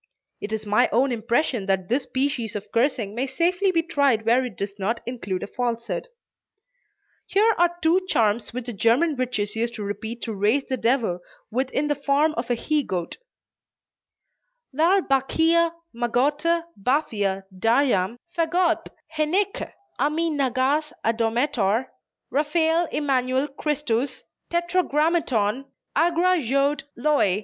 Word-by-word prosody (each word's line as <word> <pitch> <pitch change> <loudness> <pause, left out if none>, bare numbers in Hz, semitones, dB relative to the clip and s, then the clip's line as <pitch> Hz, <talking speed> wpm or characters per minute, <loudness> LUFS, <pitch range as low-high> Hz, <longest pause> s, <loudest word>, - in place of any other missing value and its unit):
It 205 - -6
is 220 -1 -3
my 205 +1 +3
own 255 +4 +2
impression 235 -1 0
that 190 -2 0
this 255 +5 0
species 255 -5 -1
of 210 - -6
cursing 230 -4 0
may 250 +4 -2
safely 355 +7 +1
be 330 -2 +1
tried 280 -9 +1
where 240 +3 +4
it 240 -8 -6
does 200 +1 -5
not 225 +5 -1
include 200 -7 -4
a - - -2
falsehood. 235 - -3 1.2
Here 440 +3 +3
are 345 0 +3
two 335 +4 +4
charms 220 0 +1
which 245 0 -5
the 240 - -5
German 240 - +2
witches 240 -5 -1
used 235 +1 -1
to 215 - -5
repeat 220 +3 -5
to 225 - -3
raise 215 +8 +1
the 260 - -2
devil 230 -7 +1 0.3
with 255 +3 -1
in 295 +2 -1
the 295 - +2
form 290 +2 +1
of 235 -2 -4
a 245 - +2
he 300 +5 0
goat: 180 -7 -4 1.6
"Lalle, 345 +7 +3
Bachea, 325 +5 +2 0.2
Magotte, 285 +8 +1
Baphia, 205 -5 0
Dajam, 225 -1 +2 0.2
Vagoth 345 +1 +1 0.3
Heneche 360 +7 0 0.3
Ammi 310 +5 +1
Nagaz, 280 +2 0
Adomator 230 0 +1 0.4
Raphael 320 +3 +2
Immanuel 265 -1 0
Christus, 275 -3 -2 0.3
Tetragrammaton 315 - +1 0.3
Agra 345 +3 +3
Jod 275 +2 0
Loi. 280 -5 +2
260 Hz, 135 wpm, -24 LUFS, 225-305 Hz, 1.6 s, where